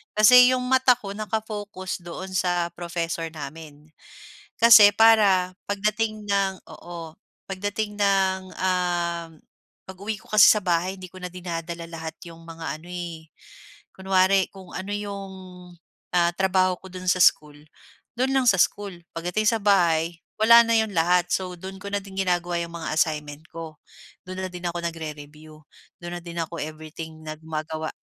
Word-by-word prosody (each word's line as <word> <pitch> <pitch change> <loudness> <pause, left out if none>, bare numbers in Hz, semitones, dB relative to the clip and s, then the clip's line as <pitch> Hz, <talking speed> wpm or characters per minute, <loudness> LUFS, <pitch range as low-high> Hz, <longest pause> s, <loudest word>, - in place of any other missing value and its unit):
Kasi 250 +4 +8
'yong 250 - -2
mata 260 -1 +4
ko 195 -1 -7
naka-focus 205 -3 -5
doon 185 +2 -7
sa 175 -2 0
professor 170 -1 -3
namin 150 0 -10 0.7
kasi 220 -3 +9
para 205 -5 +5 0.2
pagdating 215 +1 -1
ng 195 -1 0
oo, 165 -2 -9 0.4
pagdating 205 +2 -3
ng, 190 -2 +1
um 175 -2 -1 0.6
pag-uwi 200 +3 -5
ko - - -21
kasi 215 -1 +8
sa 215 - +5
bahay 180 +1 0
hindi 185 - -8
ko - - -14
na 180 - -5
dinadala 170 -1 -5
lahat 160 -1 -6
'yong 165 0 -12
mga 165 -1 -6
ano, 170 - -15
eh, 170 -3 -7 0.7
kunwari 190 0 +2
kung 190 -2 -13
ano 190 +2 -5
'yong, 200 -2 -6 0.8
ah, 170 -1 +3
trabaho 185 -1 +2
ko 190 - -12
do'n 185 0 -8
sa 185 - +2
school 150 -1 +3 0.6
do'n 265 +1 +1
lang 265 - +3
sa 190 - +3
school. 200 -1 0 0.2
Pagdating 180 +6 -1
sa 225 - 0
bahay 170 -4 +2 0.2
wala 230 +2 +8
na 230 - +3
'yon 220 -1 +1
lahat. 175 +1 +2
So, 185 -1 -2
do'n 190 +2 -9
ko 200 - -6
na 205 - -1
din 195 -1 -12
ginagawa 175 -2 0
'yong 170 - -5
mga 160 -2 -4
assignment 150 -2 -1
ko, 160 -2 -9 0.5
do'n 185 0 -5
na - - -11
din 180 0 -7
ako 175 0 -4
nagre-review. 155 -1 -8 0.4
Do'n 175 0 -6
na - - -17
din 170 0 -8
ako 165 0 -5
everything 155 +1 -8
nag 155 0 -7
magawa. 155 0 -4
180 Hz, 160 wpm, -24 LUFS, 165-200 Hz, 0.8 s, kasi